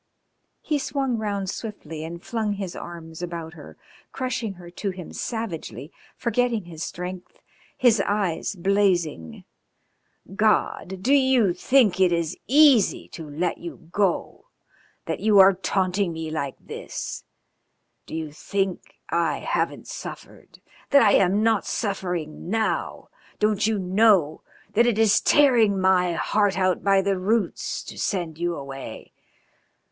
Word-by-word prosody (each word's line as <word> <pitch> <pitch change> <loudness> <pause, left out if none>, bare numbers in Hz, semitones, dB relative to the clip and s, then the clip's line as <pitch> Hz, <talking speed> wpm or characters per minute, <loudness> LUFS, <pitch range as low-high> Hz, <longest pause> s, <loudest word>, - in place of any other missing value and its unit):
He 300 -2 0
swung 270 -3 -1
round 200 -2 -2
swiftly 165 -7 -6
and 170 +2 -7
flung 220 -3 -2
his 195 -3 -5
arms 165 -1 -9
about 170 -2 -5
her, 155 -4 -13 0.3
crushing 250 -5 -3
her 175 -2 -12
to 200 +3 -3
him 185 -2 -8
savagely, 185 - -5 0.3
forgetting 235 -4 0
his 165 -2 -7
strength, 180 +1 -7 0.4
his 230 -5 +4
eyes 200 -2 -1
blazing. 175 - 0 0.9
"God! 195 -3 +1
Do 270 - +3
you 260 -8 +4
think 215 +1 +3
it 185 -2 +4
is 170 -1 -1
easy 275 -6 +5
to 160 -3 -9
let 165 +4 -2
you 165 -1 -10
go, 195 - -1 0.6
that - - -3
you 215 -1 +3
are 195 0 +8
taunting 185 0 0
me 160 -1 -5
like 140 -4 -3
this? - - -6 0.8
Do - - -6
you 160 -2 -4
think 190 +5 -3 0.2
I 170 -1 +1
haven't - - -2
suffered, - - -10 0.3
that 280 -3 +6
I'm 200 -1 +4
not 225 -2 +2
suffering 180 -7 -3
now? 220 +1 -1 0.3
Don't 210 0 +2
you 220 -1 +1
know 190 -4 +3 0.3
that 235 +3 +4
it 235 -3 +1
is 220 -1 +4
tearing 235 -9 +4
my 185 -2 +3
heart 200 +4 +1
out 185 -1 +1
by 195 -1 +4
the 195 -1 0
roots 205 0 -1
to - - -10
send 170 -5 -2
you 175 0 -1
away? 135 -2 -8
190 Hz, 135 wpm, -24 LUFS, 170-220 Hz, 0.9 s, are